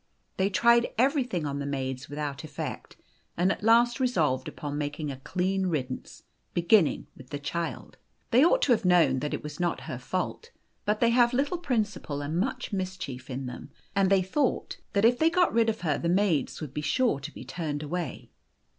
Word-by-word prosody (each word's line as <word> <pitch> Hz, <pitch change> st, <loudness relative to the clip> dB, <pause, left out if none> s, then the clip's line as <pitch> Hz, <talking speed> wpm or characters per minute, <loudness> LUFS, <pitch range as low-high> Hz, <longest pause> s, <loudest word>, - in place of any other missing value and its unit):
They 190 Hz, +1 st, +2 dB
tried 235 Hz, +3 st, +4 dB
everything 250 Hz, -, +1 dB
on 140 Hz, -1 st, -3 dB
the 140 Hz, -, -3 dB
maids 130 Hz, -2 st, -3 dB
without 145 Hz, 0 st, -4 dB
effect, 155 Hz, -2 st, -6 dB, 0.4 s
and 180 Hz, +3 st, +3 dB
at -, -, -3 dB
last 235 Hz, +3 st, +4 dB
resolved 155 Hz, -, +1 dB
upon 145 Hz, -1 st, -5 dB
making 145 Hz, 0 st, -3 dB
a 135 Hz, -, -7 dB
clean 185 Hz, +6 st, -1 dB
riddance, 135 Hz, -7 st, -4 dB, 0.3 s
beginning 175 Hz, 0 st, +3 dB
with 130 Hz, -1 st, -14 dB
the 145 Hz, -, -3 dB
child. 165 Hz, +4 st, -4 dB, 0.3 s
They 250 Hz, +4 st, +6 dB
ought -, -, +4 dB
to -, -, +3 dB
have 225 Hz, -2 st, +3 dB
known 180 Hz, -7 st, +4 dB
that 150 Hz, +2 st, -3 dB
it -, -, -7 dB
was 150 Hz, 0 st, -7 dB
not 175 Hz, -1 st, 0 dB
her -, -, -6 dB
fault, 460 Hz, -, -3 dB, 0.4 s
but 210 Hz, 0 st, 0 dB
they 235 Hz, -1 st, +5 dB
have 240 Hz, 0 st, +4 dB
little 285 Hz, +7 st, 0 dB
principle 215 Hz, -, -2 dB
and 150 Hz, +3 st, -3 dB
much 245 Hz, +1 st, -2 dB
mischief 180 Hz, -10 st, -4 dB
in 130 Hz, +1 st, -4 dB
them, 125 Hz, -, -7 dB, 0.3 s
and 195 Hz, -1 st, +3 dB
they 195 Hz, -1 st, +4 dB
thought 255 Hz, +9 st, -1 dB, 0.2 s
that 200 Hz, +2 st, +3 dB
if 245 Hz, +2 st, +4 dB
they 320 Hz, -, +5 dB
got 355 Hz, +1 st, +2 dB
rid 230 Hz, 0 st, +3 dB
of 220 Hz, -, -3 dB
her 155 Hz, -5 st, 0 dB
the 170 Hz, -, -1 dB
maids 180 Hz, -5 st, +1 dB
would 145 Hz, -4 st, -6 dB
be 150 Hz, -, -3 dB
sure 225 Hz, -, +1 dB
to 145 Hz, +3 st, -7 dB
be -, -, -10 dB
turned 155 Hz, -4 st, -4 dB
away. 160 Hz, -2 st, -4 dB
180 Hz, 195 wpm, -28 LUFS, 145-235 Hz, 0.4 s, They